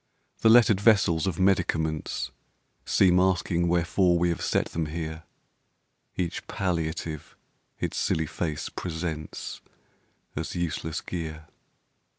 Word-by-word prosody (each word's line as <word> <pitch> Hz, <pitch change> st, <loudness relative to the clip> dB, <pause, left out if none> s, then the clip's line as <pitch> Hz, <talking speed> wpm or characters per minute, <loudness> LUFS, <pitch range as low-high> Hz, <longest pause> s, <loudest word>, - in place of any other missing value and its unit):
The 110 Hz, -, +5 dB
lettered 110 Hz, -4 st, +6 dB
vessels 100 Hz, -6 st, +4 dB
of 90 Hz, -4 st, -1 dB
medicaments 80 Hz, -5 st, 0 dB, 0.6 s
Seem 90 Hz, -1 st, +5 dB
asking 90 Hz, -2 st, +2 dB
wherefore 85 Hz, +1 st, +3 dB
we 85 Hz, +1 st, +2 dB
have 85 Hz, -, -2 dB
set -, -, +1 dB
them 80 Hz, -1 st, -2 dB
here; 80 Hz, 0 st, -5 dB, 0.9 s
Each 85 Hz, -2 st, -3 dB
palliative 80 Hz, -4 st, -3 dB, 0.4 s
its -, -, -2 dB
silly 80 Hz, -, +1 dB
face 75 Hz, -1 st, -3 dB
presents 80 Hz, -3 st, -5 dB, 0.7 s
As 80 Hz, +4 st, -4 dB
useless 80 Hz, -2 st, -2 dB
gear. 80 Hz, -3 st, -5 dB
85 Hz, 110 wpm, -27 LUFS, 80-90 Hz, 0.9 s, lettered